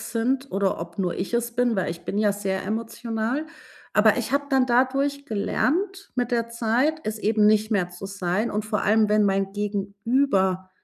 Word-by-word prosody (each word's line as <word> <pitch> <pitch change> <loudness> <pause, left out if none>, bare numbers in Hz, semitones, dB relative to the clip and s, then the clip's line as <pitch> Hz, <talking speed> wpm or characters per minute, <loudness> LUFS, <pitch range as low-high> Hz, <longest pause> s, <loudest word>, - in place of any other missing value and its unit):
sind 255 +4 -1
oder 195 -2 0
ob 170 +1 -8
nur 180 -3 0
ich 195 +5 -4
es 235 0 0
bin, 245 -2 +1
weil 190 - 0
ich 170 - -7
bin 205 - -2
ja 210 -1 +3
sehr 195 -2 -3
emotional. 230 +5 -3 0.5
Aber, - - +5
ich - - -3
habe 285 0 +2
dann 265 -2 +3
dadurch 270 +3 +1
gelernt 360 - -1
mit 245 -1 0
der 230 -1 +1
Zeit, 240 +7 +1
es 215 0 -3
eben 215 0 +3
nicht 215 +1 +3
mehr 195 -5 +1
zu 180 +2 -10
sein 195 +3 -1
und 210 0 -2
vor 215 -2 -1
allem, 215 +1 +3
wenn 210 0 +3
mein 195 0 +1
Gegenüber 200 -1 0
220 Hz, 190 wpm, -24 LUFS, 200-245 Hz, 0.5 s, Aber